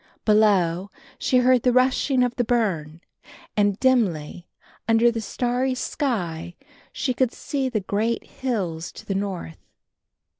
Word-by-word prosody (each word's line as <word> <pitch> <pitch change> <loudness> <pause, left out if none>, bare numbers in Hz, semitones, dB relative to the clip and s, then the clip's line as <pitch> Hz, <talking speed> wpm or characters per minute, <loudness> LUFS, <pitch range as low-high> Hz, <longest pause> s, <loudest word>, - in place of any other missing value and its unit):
Below, 200 -4 +3 0.3
she 255 - +2
heard 250 0 +4
the 250 - +3
rushing 255 +1 +3
of 245 -1 -1
the 245 - +1
burn, 175 -10 -1 0.5
and, 205 -1 +2
dimly, 180 - +1 0.4
under 230 +1 +4
the 230 -1 -3
starry 250 +4 -1
sky 175 - -3 0.4
she 255 - -1
could 255 -1 +1
see 270 -1 -3
the 220 -5 -1
great 215 +5 -1
hills 185 -11 -3
to - - -12
the 195 - -2
north. 190 - -4
220 Hz, 135 wpm, -24 LUFS, 180-250 Hz, 0.5 s, heard